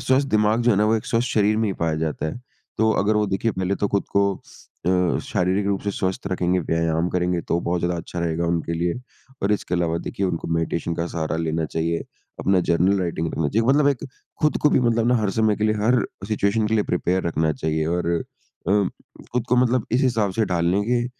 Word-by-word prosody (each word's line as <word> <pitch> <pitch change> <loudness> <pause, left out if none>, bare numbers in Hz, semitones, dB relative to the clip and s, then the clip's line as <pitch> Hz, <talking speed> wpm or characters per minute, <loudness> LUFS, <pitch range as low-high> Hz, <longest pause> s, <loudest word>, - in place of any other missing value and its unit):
स्वस्थ 130 +2 +3
दिमाग 110 +2 +2
जो 120 - +4
है 105 - +3
ना, 105 - +3
वो 110 - +3
एक 110 - -5
स्वस्थ 120 0 0
शरीर 105 0 +2
में 110 -1 +1
ही - - -1
पाया 80 -1 +1
जाता 80 0 -2
है। 100 +10 -5 0.4
तो 110 0 +3
अगर 105 +2 +2
वो 105 - +2
देखिए 100 +4 0
पहले 95 +1 -1
तो 100 - 0
खुद 100 0 0
को 100 -1 +3 0.5
अ, - - +4 0.3
शारीरिक 95 +3 0
रूप 100 -1 0
से 100 - -1
स्वस्थ 95 0 -3
रखेंगे, 90 -1 +1
व्यायाम 80 +1 0
करेंगे, 90 -1 0
तो 85 - -1
बहुत 85 0 -1
ज़्यादा 85 0 0
अच्छा 85 +1 -6
रहेगा 85 0 -1
उनके 85 0 -1
लिए। 85 +1 0 0.5
और 100 - +2
इसके 95 -3 -1
अलावा 85 -1 0
देखिए 100 - -1
उनको 85 -3 -3
मेडिटेशन 85 0 -1
का 85 +1 -2
सहारा 80 -1 -2
लेना 80 0 -1
चाहिए, 85 +1 -2 0.3
अपना 95 -1 +2
जर्नल 90 +4 +3
राइटिंग 85 -2 -2
करना 80 -3 0
चाहिए। 115 +6 +1
मतलब 145 +1 +4
एक 140 -4 -1 0.4
खुद 150 - +2
को 150 - +5
भी - - +3
मतलब 115 -1 +2
ना 125 - +4
हर 105 -3 0
समय 110 0 +2
के 105 - -1
लिए, 110 0 +2
हर 115 +2 +2 0.2
सिचुएशन 105 +1 +1
के 110 - 0
लिए 105 - +2
प्रिपेयर 90 +1 0
रखना 80 -1 +1
चाहिए। 80 +2 -1
और 85 0 -1 0.6
अ, - - +3 0.6
खुद 125 -2 0
को 125 - +3
मतलब 125 -1 +2
इस 125 - +3
हिसाब 110 -7 +1
से 110 +3 +1
ढाल 90 -4 -1
लेंगे 120 +6 +1
95 Hz, 225 wpm, -23 LUFS, 85-110 Hz, 0.6 s, को